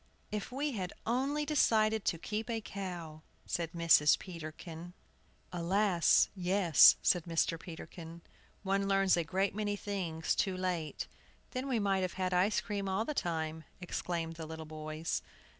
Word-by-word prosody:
"If 210 +3 -4
we 285 +3 -1
had 185 -7 -4
only 275 +5 0
decided 220 -7 +3
to 170 - +1
keep 215 +7 -4
a 230 -1 -1
cow," 175 -7 -6 0.2
said 165 -2 -2
Mrs. 165 -3 +5
Peterkin. 165 0 -8 0.6
"Alas! 180 +1 +3
yes," 180 -3 +6
said 175 -3 +3
Mr. 165 -1 0
Peterkin, 165 0 -9 0.4
"one 195 0 +1
learns 195 -1 +4
a 170 - +1
great 190 +4 0
many 205 0 -1
things 180 -6 -2
too 190 -2 0
late!" 180 -4 -2 0.5
"Then 255 +1 -3
we 255 -3 +1
might 195 -2 +1
have 185 -2 -2
had 185 -1 -1
ice 185 +4 +3
cream 200 -2 -3
all 195 +4 0
the 300 - -2
time!" 160 - -2 0.2
exclaimed 170 -2 -3
the 160 -1 -6
little 160 0 -7
boys. 155 +1 -4
185 Hz, 150 wpm, -33 LUFS, 165-205 Hz, 0.6 s, yes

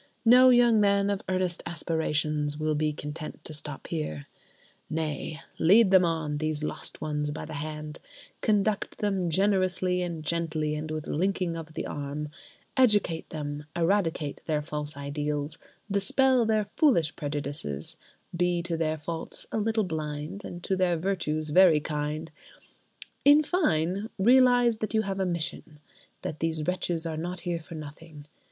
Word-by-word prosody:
No 250 +2 +8
young 240 -3 +6
man 200 0 +3
of 200 - -2
earnest 185 -2 0
aspirations 155 -3 -1
will 155 0 0
be 155 0 +1
content 150 +1 -7
to 155 - -5
stop 150 -2 -7
there. 75 - -3 0.6
Nay: 155 0 -3 0.2
lead 195 +4 +6
them 190 -1 +7
on, 155 -3 -1
these 155 -1 -1
lost - - -4
ones, 150 -1 -1
by 145 - -5
the 160 - -8
hand; 150 +1 -5 0.4
conduct 210 -1 +1
them 195 -4 0
"generously 185 0 +1
and 170 -3 -4
gently, 155 -2 -1
and 150 +1 -4
with 155 -1 -4
linking 180 0 0
of 160 -1 -8
the - - -3
arm"; 145 +1 -4 0.5
educate 210 -10 +3
them, 145 -1 -5
eradicate 165 -4 0
their 150 -2 0
false 150 0 -4
ideals, 145 +1 -3 0.3
dispel 245 +5 +3
their 215 -1 +2
foolish 175 - +3
prejudices; 140 - -4 0.4
be 175 0 +1
to 170 -1 -2
their 160 -1 0
faults 160 +2 -5
a - - 0
little 220 +1 +1
blind 155 +2 -4
and 175 -2 -8
to 190 - 0
their 180 -2 +2
virtues 155 -4 -1
very 175 -2 +7
kind: 150 +1 -3 0.9
in 290 +2 +7
fine, 200 - 0
realise 245 +1 +5
that 215 0 -3
you 220 - +3
have 195 -1 -3
a 190 - +1
mission—that 155 -2 -6
these 160 -1 -1
wretches 175 -1 -1
are 160 -1 -3
not 175 +3 -4
here 175 -2 -2
for 165 +1 -10
nothing. 155 0 -10
165 Hz, 150 wpm, -28 LUFS, 150-195 Hz, 0.9 s, No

